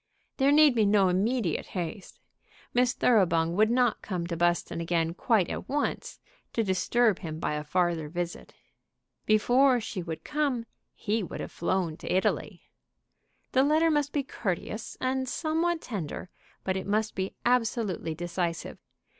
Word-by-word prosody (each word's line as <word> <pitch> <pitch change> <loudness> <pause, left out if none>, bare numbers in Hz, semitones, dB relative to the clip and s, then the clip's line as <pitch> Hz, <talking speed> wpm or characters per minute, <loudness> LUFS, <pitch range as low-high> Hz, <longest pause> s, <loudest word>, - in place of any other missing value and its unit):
There 275 +1 +4
need 300 -2 +6
be 225 -2 +3
no 200 -2 +4
immediate 200 0 0
haste. 180 +3 -5 0.5
Miss 245 0 +3
Thoroughbung 170 -9 +3
would 215 +2 +4
not 245 -1 +2
come 180 -4 -3
to 170 0 -3
Buston 175 0 0
again 165 -1 0
quite 200 -1 +2
at - - -6
once 290 +2 -2 0.3
to 230 - +1
disturb 210 +2 +2
him 160 -3 -5
by 150 - -1
a 150 0 -3
farther 170 -1 0
visit. 175 +1 -5 0.8
Before 245 +4 +4
she 205 -4 -5
would 165 -2 -6
come 285 -6 -1 0.3
he 220 +1 -1
would 185 - -6
have - - -5
flown 170 -2 -1
to - - -6
Italy. 185 +1 0 0.9
The 260 - +4
letter 310 +4 +3
must 295 -1 +1
be 285 - 0
courteous, 215 -2 -4
and 260 0 -1
somewhat 325 +2 0
tender, 185 - -5 0.3
but 190 - -1
it 190 - -4
must 215 +2 0
be 190 0 -3
absolutely 225 -9 0
decisive. 175 0 -3
205 Hz, 150 wpm, -28 LUFS, 175-250 Hz, 0.9 s, need